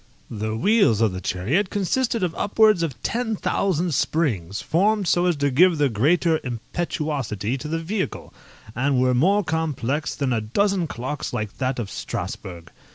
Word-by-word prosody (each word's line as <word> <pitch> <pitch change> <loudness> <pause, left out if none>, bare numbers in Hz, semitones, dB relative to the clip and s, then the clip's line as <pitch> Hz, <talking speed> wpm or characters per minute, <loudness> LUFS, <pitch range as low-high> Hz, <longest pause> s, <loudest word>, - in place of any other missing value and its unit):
The 110 0 -3
wheels 200 - +3
of 110 -3 +3
the 95 - -5
chariot 125 - 0
consisted 225 +3 0
of 175 -2 0
upwards 210 -1 +3
of 155 -7 -3
ten 230 -2 -1
thousand 180 -4 0
springs, 110 - 0
formed 200 +3 +1
so 175 +1 +3
as 175 - +2
to 145 -1 0
give 170 +5 +5
the 145 -2 +2
greater 160 +8 +2
impetuosity 130 - -3
to 140 - -6
the 165 +2 -1
vehicle, 185 +4 -4 0.4
and 135 +2 +1
were 130 0 +3
more 190 +11 +3
complex 150 -3 -2
than 135 -3 0
a 115 - 0
dozen 185 - 0
clocks 130 +2 -5
like 110 -4 -4
that 130 0 -1
of 110 -5 -4
Strasburgh. 85 -4 -6
150 Hz, 160 wpm, -23 LUFS, 120-180 Hz, 0.4 s, give